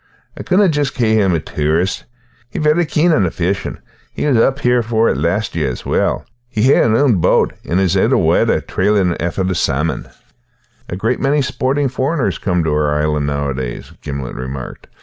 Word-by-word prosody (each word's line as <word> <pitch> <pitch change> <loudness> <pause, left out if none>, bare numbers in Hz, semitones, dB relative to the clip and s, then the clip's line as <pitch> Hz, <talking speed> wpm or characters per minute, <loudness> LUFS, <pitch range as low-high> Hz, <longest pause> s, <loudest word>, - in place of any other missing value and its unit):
I - - -7
couldna 190 +2 +3
just 145 -4 0
cae 115 -4 +1
him 100 -4 +3
a - - 0
tourist. 80 +6 -1 0.4
He's 150 - -4
vary 155 +2 +2
keen 160 +3 +2
on 115 - +3
the 90 - +1
fishin' 90 +4 -2 0.4
and 145 -3 +1
was 115 - +4
up 135 - +1
here 125 0 +3
for 115 0 +1
it - - 0
last 85 +10 -1
year 80 -5 0
as 60 - -7
well. - - 0 0.2
He 110 -3 -1
has - - +4
his 110 0 +2
ain 125 -8 +3
boat - - +2
and 85 - 0
is 95 -1 +1
aye 95 - +3
on - - +1
the - - +3
water - - +2
trailin' 95 -3 +1
aefter 85 +3 -2
the 95 - 0
salmon." 75 -1 -1 0.8
"A - - -3
great 115 +6 -1
many 140 +1 +1
sporting 135 +2 0
foreigners 130 - -1
come 90 -3 0
to 80 - 0
our 75 -1 +1
island 75 -1 0
nowadays," 70 -4 -3
Gimblet 70 -3 -5
remarked. 65 +1 -7
95 Hz, 200 wpm, -17 LUFS, 75-130 Hz, 0.8 s, was